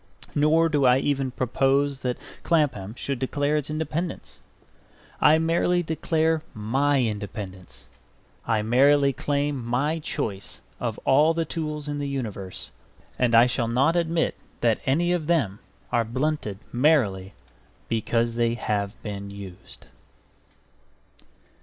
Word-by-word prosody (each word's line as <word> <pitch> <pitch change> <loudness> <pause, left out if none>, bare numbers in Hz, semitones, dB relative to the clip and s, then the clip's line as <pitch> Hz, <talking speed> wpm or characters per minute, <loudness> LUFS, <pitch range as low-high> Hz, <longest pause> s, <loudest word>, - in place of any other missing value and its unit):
Nor 155 +3 +4
do 150 -3 +1
I 125 0 +6
even 135 -1 0
propose 135 +2 +1
that 125 -1 -1 0.2
Clapham 125 - 0
should 135 0 -3
declare 145 +3 0
its 150 -1 -1
independence. 160 +3 -4 0.8
I 155 +1 +6
merely 170 +2 +2
declare 160 0 0
my 135 +6 +1
independence. 100 -4 -6 0.6
I 110 -2 +1
merely 140 +4 +4
claim 145 -1 -1
my 135 +7 0
choice 100 - -4 0.2
of - - -3
all 150 +4 +4
the 165 0 0
tools 150 -3 -4
in 145 0 -3
the 145 - -2
universe; 105 -8 -5 0.5
and 120 -2 +3
I 115 +1 +8
shall 125 -1 0
not 135 +8 +2
admit 170 -1 +1 0.3
that 115 -2 +2
any 170 +6 +2
of 170 -4 -1
them 130 - +1 0.3
are 120 - +2
blunted 130 -3 -2 0.2
merely 120 -9 +2 0.5
because 115 +1 0
they 115 0 +1
have 105 -2 -2
been 100 -2 -5
used. 100 -2 -11
135 Hz, 125 wpm, -25 LUFS, 115-150 Hz, 0.8 s, I